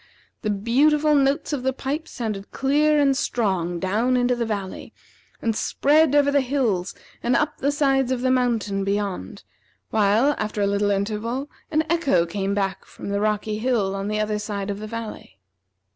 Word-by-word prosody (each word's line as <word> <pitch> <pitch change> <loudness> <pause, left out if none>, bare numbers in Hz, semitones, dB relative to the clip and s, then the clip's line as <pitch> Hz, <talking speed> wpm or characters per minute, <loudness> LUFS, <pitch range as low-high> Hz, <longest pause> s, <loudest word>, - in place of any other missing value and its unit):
The 215 - -2
beautiful 290 +9 +3
notes 280 +1 +2
of 280 - -1
the 265 +1 0
pipes 285 +4 -4
sounded 215 -5 -4
clear 295 +3 +2
and 275 -2 +3
strong 190 -9 -1
down 220 +8 +1
into 245 0 +2
the 235 -1 -2
valley, 200 -3 -5 0.5
and 225 -2 +1
spread 295 +5 +3
over 285 -1 +4
the 280 0 +3
hills, 240 -9 -1 0.3
and 240 +1 +1
up 300 0 0
the 280 - +1
sides 270 -3 +2
of 255 -2 -1
the 255 0 +2
mountain 230 -6 +1
beyond, 200 - -3 0.5
while, 220 +6 +3
after 215 0 -3
a 200 - +3
little 200 +1 +1
interval, 215 +7 -2 0.2
an 310 0 +2
echo 285 - +2
came 195 +3 -2
back 195 -1 -1
from - - -9
the 200 0 -1
rocky 215 0 -1
hill 220 -5 +1
on 195 0 -3
the 215 0 -1
other 215 0 -1
side 205 -1 -3
of 200 - -5
the 215 - -6
valley. 230 - -7
225 Hz, 175 wpm, -23 LUFS, 200-270 Hz, 0.5 s, over